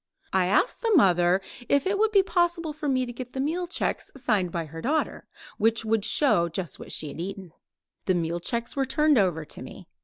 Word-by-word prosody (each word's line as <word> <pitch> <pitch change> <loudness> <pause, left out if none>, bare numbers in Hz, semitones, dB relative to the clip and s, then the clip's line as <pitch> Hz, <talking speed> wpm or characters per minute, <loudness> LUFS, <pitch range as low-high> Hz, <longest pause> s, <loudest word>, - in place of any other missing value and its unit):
I 185 -1 +3
asked 205 - +2
the 460 - 0
mother 180 - +4 0.3
if 280 -1 +3
it 395 +1 0
would 435 0 +3
be 395 -2 +5
possible 345 -4 0
for 300 -1 -3
me 255 -1 +1
to 240 - -7
get 250 +1 -8
the 265 - -4
meal 335 +6 -1
checks 355 - -2
signed 210 -9 0
by 165 -1 -3
her 165 +2 -9
daughter, 305 +5 -1 0.3
which 225 +1 +2
would 220 -1 +1
show 170 - +3
just 170 0 -4
what - - -9
she 155 - -1
had 155 - -7
eaten. 190 -2 -7 0.5
The 185 - +2
meal 170 0 -1
checks 235 - -4
were 270 -1 0
turned 300 -1 +3
over 170 -5 +1
to - - -8
me. - - -10
235 Hz, 215 wpm, -26 LUFS, -, 0.5 s, be